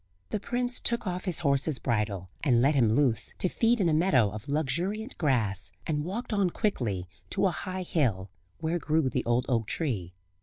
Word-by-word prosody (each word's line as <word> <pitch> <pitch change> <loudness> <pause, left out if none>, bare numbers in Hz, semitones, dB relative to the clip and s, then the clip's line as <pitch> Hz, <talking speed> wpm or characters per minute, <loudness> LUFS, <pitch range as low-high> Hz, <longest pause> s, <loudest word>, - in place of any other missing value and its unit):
The 215 - -1
prince 245 +4 -1
took 235 -1 +1
off 180 0 -3
his 180 -3 +2
horse's 140 -1 +2
bridle, 105 -7 -2
and 125 -6 +4
let 135 +5 +4
him 115 -6 +3
loose 130 -5 +1
to - - +2
feed 230 +5 +2
in 190 - +3
a 160 - +2
meadow 145 - +3
of 110 +7 -8
luxuriant 170 - -1
grass, 105 - +1
and 150 -2 -1
walked 210 +8 -4
on 200 -3 +2
quickly 115 - -1 0.2
to 200 0 +1
a 190 - +3
high 185 +2 -4
hill, 110 - 0 0.3
where 165 +2 -1
grew 155 -3 +1
the 130 - -1
old 120 +1 +1
oak 115 -4 0
tree. 100 - -2
150 Hz, 190 wpm, -28 LUFS, 115-185 Hz, 0.3 s, and